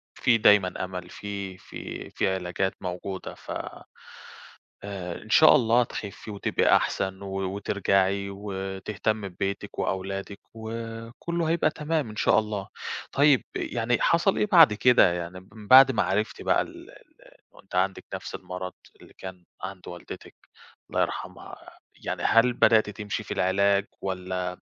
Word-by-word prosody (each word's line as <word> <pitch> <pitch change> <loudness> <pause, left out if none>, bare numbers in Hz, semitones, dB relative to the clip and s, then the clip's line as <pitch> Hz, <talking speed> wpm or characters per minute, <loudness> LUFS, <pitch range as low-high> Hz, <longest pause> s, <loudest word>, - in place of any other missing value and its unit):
في 115 -2 +3
دايمًا 105 -4 +4
أمل، 90 -1 -7
في 100 -2 -6
في - - -8
في - - 0
علاجات 95 +1 -2
موجودة، 90 +1 -5
ف - - -10 1.3
آآ، 95 -4 -6
إن 110 - -15
شاء 155 +7 +7
الله 120 -2 +4
تخفِّي 105 -1 -7
وتبقي 100 - +2
أحسن، 95 0 -1
و 95 -1 -6 0.2
وترجعي 100 -1 +1
وتهتمّي 100 +1 -3
ببيتِك 100 +3 -4
وأولادِك، 95 +1 -3
وكلّه 115 +8 -5
هيبقى 165 -2 +2
تمام 150 -5 -2
إن 105 - -9
شاء 110 - +4
الله، 105 -2 -4 0.4
طيب 140 -2 +4
يعني 120 0 -1
حصل 170 +4 +3
إيه - - +2
بعد 165 - +8
كده؟ 120 -5 +5
يعني 90 +1 -5
من 105 -2 -12
بعد 135 +1 +9
ما 120 - +1
عرفتِ 105 +3 -1
بقى - - +2
ال - - -9
ال - - -18 0.5
وأنتِ 95 - -12
عندِك 95 +1 0
نفْس - - -5
المرض 90 0 -6 0.3
اللي - - -16
كان 95 -1 -9 0.2
عند 95 -1 -7
والدتِك- 90 0 -9 0.5
الله - - 0
يرحمها- - - -4 0.5
يعني - - -3
هل 115 +2 +4
بدأتِ 110 -3 +4
تمشي 105 0 -4
في - - -5
العلاج، 100 +2 +2 0.2
والّا 90 -1 -3
100 Hz, 140 wpm, -26 LUFS, 95-115 Hz, 1.3 s, بعد